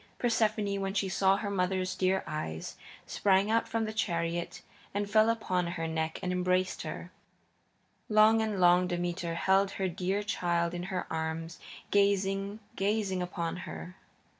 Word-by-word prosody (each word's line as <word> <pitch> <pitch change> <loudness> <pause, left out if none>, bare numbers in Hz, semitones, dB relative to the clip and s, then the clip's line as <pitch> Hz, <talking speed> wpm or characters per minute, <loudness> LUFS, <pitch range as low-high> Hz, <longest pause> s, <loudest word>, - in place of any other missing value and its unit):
Persephone, 215 -4 +1
when 195 0 -2
she 195 -1 +1
saw 190 +1 +3
her 205 0 -3
mother's 185 -1 0
dear 190 +1 +1
eyes, 80 - -5 0.3
sprang 195 +1 +2
out 230 0 +1
of 225 0 0
the 215 - -4
chariot 170 -5 -2 0.3
and 205 0 0
fell 215 +2 +4
upon 185 -6 0
her 165 -1 -3
neck 160 0 -2
and 180 - -1
embraced 180 +1 0
her. - - -6 1.0
Long 215 +1 +6
and 215 -3 -1
long 180 0 +5
Demeter 175 -1 -2
held 195 +3 +3
her 190 - -1
dear 185 +3 -1
child 170 -4 0
in 175 - -3
her 185 -2 -2
arms, 160 +1 -3 0.3
gazing, 200 +1 +1
gazing 195 -2 0
upon 175 -1 -3
her. 80 - -8
190 Hz, 150 wpm, -30 LUFS, 175-205 Hz, 1.0 s, Long